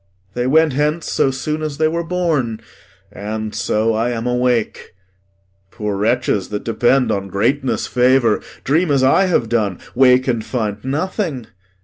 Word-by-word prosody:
They 125 Hz, 0 st, -1 dB
went 160 Hz, +1 st, +3 dB
hence 150 Hz, +4 st, -1 dB
so -, -, +2 dB
soon 150 Hz, +4 st, -3 dB
as 150 Hz, -2 st, -4 dB
they 155 Hz, 0 st, +2 dB
were 170 Hz, +2 st, -2 dB
born. 160 Hz, -10 st, -1 dB, 0.5 s
And 110 Hz, +1 st, -5 dB
so 110 Hz, +1 st, 0 dB
I 115 Hz, +2 st, 0 dB
am 115 Hz, -1 st, -3 dB
awake. 125 Hz, -5 st, -1 dB, 0.7 s
Poor 105 Hz, 0 st, -4 dB
wretches, 105 Hz, -1 st, 0 dB
that 105 Hz, -1 st, -4 dB
depend 120 Hz, +3 st, +2 dB
On 100 Hz, -1 st, -2 dB
greatness' 125 Hz, +8 st, 0 dB
favour, 125 Hz, -3 st, +2 dB, 0.2 s
dream 160 Hz, +5 st, +1 dB
as 140 Hz, -2 st, +2 dB
I 160 Hz, +9 st, +4 dB
have 165 Hz, -11 st, +1 dB
done; 105 Hz, -5 st, 0 dB, 0.2 s
Wake 130 Hz, 0 st, +4 dB
and 120 Hz, -3 st, 0 dB
find 105 Hz, -4 st, -3 dB
nothing. 150 Hz, -, -2 dB
125 Hz, 150 wpm, -18 LUFS, 110-150 Hz, 0.7 s, I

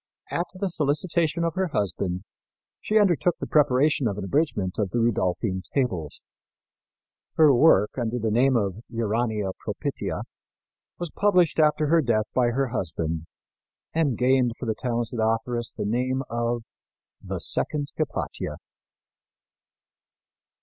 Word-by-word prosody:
At 170 Hz, -, -1 dB
the 195 Hz, +1 st, -1 dB
solicitation 165 Hz, +1 st, 0 dB
of 165 Hz, -1 st, 0 dB
her 190 Hz, +2 st, 0 dB
husband, 95 Hz, -, -2 dB, 0.6 s
she 215 Hz, -, +1 dB
undertook 180 Hz, -4 st, +3 dB
the -, -, -4 dB
preparation 140 Hz, -2 st, +3 dB
of 100 Hz, -2 st, -2 dB
an 105 Hz, -, -4 dB
abridgment 100 Hz, -, 0 dB
of 100 Hz, -3 st, 0 dB
the 120 Hz, -, -2 dB
Rudolphine 95 Hz, -4 st, 0 dB
Tables. 95 Hz, -, -1 dB, 1.1 s
Her 155 Hz, -3 st, +6 dB
work, 120 Hz, -6 st, +5 dB
under 120 Hz, 0 st, -1 dB
the 110 Hz, -2 st, -1 dB
name 130 Hz, +4 st, +3 dB
of 100 Hz, -1 st, -2 dB
Urania 110 Hz, -3 st, -1 dB
Propitia, -, -, -4 dB, 0.7 s
was 175 Hz, -3 st, -4 dB
published 180 Hz, -6 st, +3 dB
after 150 Hz, 0 st, +3 dB
her 165 Hz, +2 st, +4 dB
death 110 Hz, -5 st, +1 dB
by 125 Hz, -1 st, +3 dB
her 130 Hz, +2 st, 0 dB
husband, 80 Hz, -6 st, -3 dB, 0.7 s
and 150 Hz, -8 st, +1 dB
gained 125 Hz, -1 st, +3 dB
for -, -, -6 dB
the 110 Hz, -, 0 dB
talented 120 Hz, 0 st, -2 dB
authoress 115 Hz, +1 st, 0 dB
the -, -, -4 dB
name 130 Hz, +5 st, 0 dB
of 120 Hz, 0 st, -1 dB, 0.6 s
"The -, -, -4 dB
second 145 Hz, -2 st, 0 dB
Hypatia." -, -, -3 dB
120 Hz, 130 wpm, -25 LUFS, 110-150 Hz, 1.1 s, Her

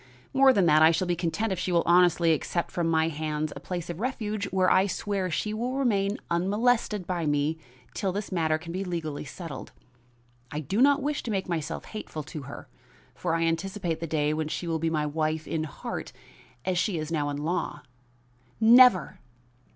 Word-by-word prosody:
More 270 Hz, 0 st, +6 dB
than 200 Hz, -8 st, +3 dB
that, 155 Hz, -1 st, +5 dB
I 160 Hz, -, +8 dB
shall 165 Hz, +3 st, +1 dB
be 175 Hz, -1 st, 0 dB
content 180 Hz, +6 st, -1 dB
if 185 Hz, -, -2 dB
she 185 Hz, +1 st, -2 dB
will 170 Hz, -1 st, +3 dB
honestly 170 Hz, -1 st, +4 dB
accept 170 Hz, +3 st, -2 dB
from 170 Hz, -2 st, -1 dB
my 160 Hz, -1 st, +2 dB
hands 155 Hz, -1 st, -3 dB
a -, -, -6 dB
place 175 Hz, -2 st, -5 dB
of 175 Hz, 0 st, -6 dB
refuge 215 Hz, -4 st, -2 dB
where 190 Hz, -2 st, +1 dB
I 190 Hz, +2 st, +4 dB
swear 195 Hz, -1 st, -2 dB
she 210 Hz, +5 st, -1 dB
shall 235 Hz, +4 st, -2 dB
remain 210 Hz, -7 st, +1 dB
unmolested 210 Hz, +3 st, +1 dB
by 170 Hz, -3 st, -2 dB
me 145 Hz, +2 st, 0 dB, 0.3 s
till 195 Hz, -, -1 dB
this 205 Hz, +2 st, -4 dB
matter 160 Hz, -3 st, +1 dB
can 170 Hz, +1 st, -9 dB
be 185 Hz, +3 st, -3 dB
legally 165 Hz, -5 st, -4 dB
settled. 150 Hz, 0 st, -8 dB, 0.8 s
I 150 Hz, -, -4 dB
do 175 Hz, -, -1 dB
not 285 Hz, +1 st, +5 dB
wish 295 Hz, +1 st, -1 dB
to -, -, -6 dB
make 195 Hz, -3 st, -1 dB
myself 165 Hz, -2 st, -3 dB
hateful 185 Hz, -8 st, -6 dB
to 155 Hz, +1 st, -7 dB
her, 140 Hz, -, -9 dB, 0.5 s
for 170 Hz, -2 st, -1 dB
I 165 Hz, -, +1 dB
anticipate 170 Hz, +1 st, -1 dB
the 165 Hz, -, -4 dB
day 150 Hz, -1 st, +1 dB
when 155 Hz, 0 st, -2 dB
she 165 Hz, -, -4 dB
will 165 Hz, -1 st, -1 dB
be 165 Hz, +1 st, 0 dB
my 155 Hz, -2 st, 0 dB
wife 155 Hz, +1 st, -1 dB
in 155 Hz, -1 st, -2 dB
heart 145 Hz, -, -6 dB, 0.5 s
as 180 Hz, -2 st, +1 dB
she 185 Hz, -2 st, 0 dB
is 155 Hz, 0 st, -4 dB
now 150 Hz, -3 st, 0 dB
in 145 Hz, -, -3 dB
law." 150 Hz, -1 st, -2 dB, 0.8 s
"Never!" 230 Hz, -, +6 dB
170 Hz, 195 wpm, -27 LUFS, 155-200 Hz, 0.8 s, I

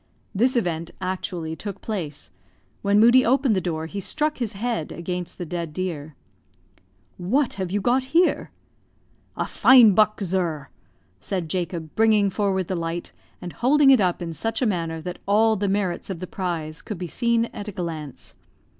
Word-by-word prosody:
This 245 Hz, +6 st, +2 dB
event 170 Hz, -7 st, -1 dB
actually 180 Hz, -3 st, -4 dB
took 200 Hz, +2 st, -7 dB
place. 170 Hz, -10 st, -5 dB, 0.5 s
When 200 Hz, +1 st, +3 dB
Moodie 240 Hz, +3 st, +7 dB
opened 260 Hz, -2 st, +3 dB
the 185 Hz, -, +1 dB
door, 160 Hz, -3 st, -3 dB
he 200 Hz, +5 st, -5 dB
struck 300 Hz, -, -1 dB
his 230 Hz, -3 st, -2 dB
head 220 Hz, -5 st, -3 dB
against 180 Hz, 0 st, -5 dB
the 175 Hz, -, -5 dB
dead 170 Hz, -1 st, -4 dB
deer. 155 Hz, -4 st, -4 dB, 1.0 s
"What 240 Hz, +10 st, +1 dB
have 180 Hz, -2 st, -3 dB
you 205 Hz, +1 st, 0 dB
got 255 Hz, +4 st, +2 dB
here?" 330 Hz, +7 st, +2 dB, 0.9 s
"A -, -, 0 dB
fine 245 Hz, -6 st, +6 dB
buck, 215 Hz, +2 st, +3 dB
zur," 170 Hz, -6 st, -2 dB, 0.5 s
said 175 Hz, -, -3 dB
Jacob, 170 Hz, -3 st, -3 dB
bringing 215 Hz, -3 st, +4 dB
forward 190 Hz, -3 st, 0 dB
the 190 Hz, -, -2 dB
light, 170 Hz, 0 st, -4 dB, 0.3 s
and 175 Hz, -, -6 dB
holding 275 Hz, +2 st, +4 dB
it 260 Hz, -5 st, +6 dB
up 180 Hz, -2 st, 0 dB
in 165 Hz, -1 st, -5 dB
such 225 Hz, +9 st, -2 dB
a 255 Hz, -, +1 dB
manner 165 Hz, -6 st, -1 dB
that 180 Hz, +2 st, -6 dB
all 220 Hz, +2 st, +4 dB
the 200 Hz, -1 st, -1 dB
merits 195 Hz, -3 st, -1 dB
of 185 Hz, -4 st, -4 dB
the 185 Hz, -, -4 dB
prize 170 Hz, -4 st, -4 dB
could 210 Hz, -, -6 dB
be 180 Hz, -, -4 dB
seen 235 Hz, +6 st, +1 dB
at 205 Hz, -, -7 dB
a -, -, -4 dB
glance. 165 Hz, -7 st, -6 dB
190 Hz, 170 wpm, -24 LUFS, 170-220 Hz, 1.0 s, Moodie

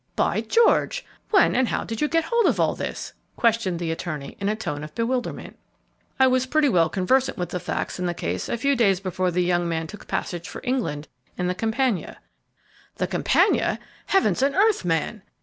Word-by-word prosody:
"By -, -, +1 dB
George! 470 Hz, +2 st, +2 dB, 0.2 s
when 390 Hz, -4 st, +4 dB
and 255 Hz, 0 st, +3 dB
how -, -, -1 dB
did 225 Hz, 0 st, -5 dB
you 300 Hz, -, +3 dB
get 330 Hz, +1 st, +1 dB
hold 470 Hz, +5 st, +2 dB
of -, -, +1 dB
all -, -, +3 dB
this?" -, -, -5 dB, 0.2 s
questioned 230 Hz, -6 st, +1 dB
the 165 Hz, -1 st, -2 dB
attorney, 155 Hz, -4 st, -5 dB
in 200 Hz, 0 st, 0 dB
a 215 Hz, -, 0 dB
tone 150 Hz, -9 st, -4 dB
of 150 Hz, 0 st, -9 dB
bewilderment. 245 Hz, +2 st, -3 dB, 0.6 s
"I 265 Hz, -, +7 dB
was 255 Hz, 0 st, +2 dB
pretty 300 Hz, +1 st, +3 dB
well 170 Hz, -7 st, +3 dB
conversant 255 Hz, +10 st, +1 dB
with 175 Hz, -1 st, -3 dB
the 180 Hz, -, -3 dB
facts 175 Hz, -, -3 dB
in 180 Hz, -, -1 dB
the 175 Hz, -, -2 dB
case -, -, -3 dB
a -, -, -1 dB
few 280 Hz, +4 st, +2 dB
days 200 Hz, -7 st, +3 dB
before 185 Hz, -1 st, -1 dB
the 180 Hz, +1 st, +1 dB
young 175 Hz, -1 st, +1 dB
man 165 Hz, -1 st, -1 dB
took 205 Hz, +5 st, -11 dB
passage 170 Hz, -2 st, -3 dB
for -, -, -8 dB
England, 240 Hz, -, -2 dB, 0.3 s
in 180 Hz, -, -1 dB
the 180 Hz, -, +1 dB
'Campania.'" 225 Hz, +1 st, -1 dB, 0.8 s
"The -, -, -1 dB
'Campania!' -, -, +2 dB, 0.3 s
Heavens 385 Hz, -8 st, +2 dB
and 275 Hz, +1 st, +2 dB
earth, 415 Hz, -, +3 dB
man! 175 Hz, +5 st, -1 dB
210 Hz, 200 wpm, -24 LUFS, 175-260 Hz, 0.8 s, I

